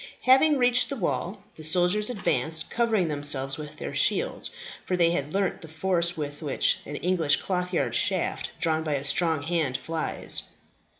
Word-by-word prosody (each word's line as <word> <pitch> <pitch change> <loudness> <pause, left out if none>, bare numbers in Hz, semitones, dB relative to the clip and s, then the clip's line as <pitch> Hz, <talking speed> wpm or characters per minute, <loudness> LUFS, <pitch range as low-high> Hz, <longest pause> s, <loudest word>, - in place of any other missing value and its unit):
Having 275 +4 +5
reached 245 -1 +3
the 280 - -3
wall, 195 -2 -3
the 155 - -9
soldiers 180 +7 +1
advanced, 160 - -1
covering 225 -6 +1
themselves 145 -2 +1
with 150 0 -8
their - - -6
shields, - - 0 0.3
for 180 - -1
they 170 -1 +4
had 150 -4 -2
learnt 195 0 -1
the 165 - -10
force 170 +2 0
with 145 0 -5
which 145 -3 +1
an 145 - -6
English 165 -3 +2
clothyard 180 -9 -2
shaft - - 0
drawn 160 -1 +1
by 155 -2 -2
a 135 - -3
strong 160 +1 +1
hand 160 -5 0
flies. 160 +4 -1
165 Hz, 165 wpm, -26 LUFS, 150-185 Hz, 0.3 s, Having